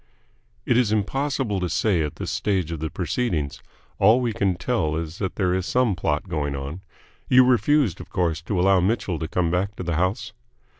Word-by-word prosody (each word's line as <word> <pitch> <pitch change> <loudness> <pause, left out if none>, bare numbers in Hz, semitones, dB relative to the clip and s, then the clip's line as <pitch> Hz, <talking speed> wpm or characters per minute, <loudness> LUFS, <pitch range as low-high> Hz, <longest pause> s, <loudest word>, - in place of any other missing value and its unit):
"It 120 - +2
is 120 -4 +2
impossible 120 0 -1
to 90 -1 -2
say 95 -4 +1
at 75 -2 -3
this - - -4
stage 95 -6 -1
of 80 - -4
the 80 +1 -3
proceedings. 85 - -2 0.4
All 110 +5 +6
we 120 -3 -1
can 95 -1 +1
tell 85 -6 -1
is 80 +1 -5
that 95 -3 -3
there 90 -3 +1
is 95 -1 -1
some 125 -4 +2
plot 75 +1 -1
going 75 -5 -2
on. 70 +6 -6 0.5
You 125 0 +7
refused, 130 - +2
of - - -12
course, 85 -4 -1
to 100 - -1
allow 95 +1 +4
Mitchell 90 -3 0
to 80 - -3
come 85 -1 0
back 95 +3 -1
to - - -6
the 85 -3 -1
house?" 90 +3 -1
95 Hz, 200 wpm, -24 LUFS, 80-110 Hz, 0.5 s, You